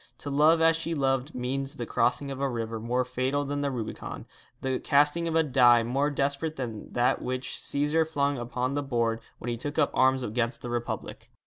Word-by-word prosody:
To 145 - -6
love 155 +4 +5
as 165 0 +5
she 165 0 -3
loved 135 0 0
means 135 +2 -2
the 120 - -4
crossing 125 +4 0
of 135 0 -5
a 140 - +1
river 115 -2 -3
more 125 +3 0
fatal 130 +3 -1
than 145 +1 -2
the 140 - 0
Rubicon, 120 -5 -5 0.4
the 130 -1 -1
casting 150 +3 +2
of 165 - -1
a 165 - +5
die 125 -4 +5
more 135 +5 +1
desperate 145 +2 -1
than 115 -6 -6
that 125 +2 +2
which 130 0 -3
Cæsar 150 +3 0
flung 145 -3 0
upon 125 +2 -2
the 145 - 0
board 115 -4 0 0.2
when 120 - -5
he 120 - -2
took 145 +5 -5
up - - +3
arms 130 0 +3
against 115 +2 -2
the 120 - -4
Republic. 120 0 -4
135 Hz, 205 wpm, -28 LUFS, 120-145 Hz, 0.4 s, love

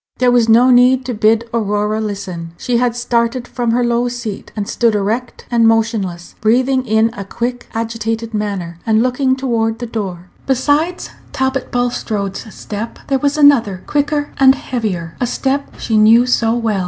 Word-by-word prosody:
There 250 -1 +3
was 240 -2 +3
no 240 +3 +6
need 250 +1 +4
to 250 - -3
bid 220 +1 +2
Aurora 210 -1 0
listen; 185 -6 -5
she 245 -1 -1
had 240 -1 +1
started 240 +1 -1
from 240 -2 -2
her 240 +2 +2
low 240 +1 +1
seat, 240 -4 -6
and 205 -2 -3
stood 230 -3 +1
erect 220 +5 -2
and 230 -1 +4
motionless, 220 -6 0
breathing 255 +4 +2
in 220 +1 +2
a 200 - -6
quick, 240 +5 -4
agitated 225 0 -3
manner, 195 -5 -3
and 220 0 +2
looking 260 +1 +1
toward 230 -4 -1
the 240 - -5
door. 190 -6 -5 0.2
Besides 290 +7 0 0.2
Talbot 265 0 -1
Bulstrode's 220 -4 -2
step 215 +3 -6
there 270 -1 +2
was 285 +2 0
another, 240 -11 +4
quicker 290 0 -1
and 265 0 +6
heavier 200 -12 -4
a 245 - +1
step 270 +3 -2
she 220 - -1
knew 225 +3 +6
so 235 -2 +1
well. 225 -4 0
230 Hz, 165 wpm, -16 LUFS, 215-250 Hz, 0.2 s, no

